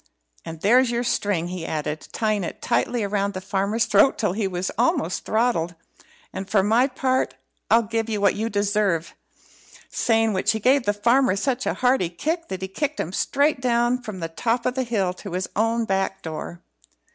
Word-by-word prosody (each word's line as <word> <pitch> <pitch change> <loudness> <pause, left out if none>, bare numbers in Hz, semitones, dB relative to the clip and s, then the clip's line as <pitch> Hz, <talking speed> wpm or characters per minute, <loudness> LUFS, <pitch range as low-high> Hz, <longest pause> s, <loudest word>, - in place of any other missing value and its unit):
And 160 -1 -8
there's 245 +5 +4
your 240 0 -1
string," 200 -7 0
he 180 -2 -5
added, 155 -1 -4
tying 215 -3 0
it 170 - -6
tightly 240 -4 0
round 200 0 -1
the - - -2
farmer's 200 +3 0
throat 205 +7 +4
till 210 -6 0
he 205 0 -1
was 180 0 -3
almost 165 +3 0
throttled. 215 -7 0 0.6
"And, 190 0 -6
for 195 -3 +3
my 230 +6 +3
part, 260 -1 0 0.3
I'll 230 +1 +5
give 225 +1 -2
you 215 -2 -1
what 200 -1 +3
you 220 +2 -2
deserve;" 205 -5 0 0.8
saying 225 -2 +2
which 185 +3 +1
he 220 - -2
gave 255 +3 +3
the - - +5
farmer 235 +2 +3
such 255 +5 -1
a - - 0
hearty 250 -8 +2
kick 325 - -3
that 190 0 -5
he - - -2
kicked 295 +9 -3
him 175 - -3
straight 285 +5 +1
down 240 0 +1
from 215 -7 -7
the 165 - -2
top 230 +8 -1
of 250 - +1
the 260 - -1
hill 210 -7 0
to 190 0 -9
his 185 +1 -2
own 225 +2 +1
back 195 -1 -1
door. 165 +2 -6
210 Hz, 190 wpm, -23 LUFS, 190-240 Hz, 0.8 s, I'll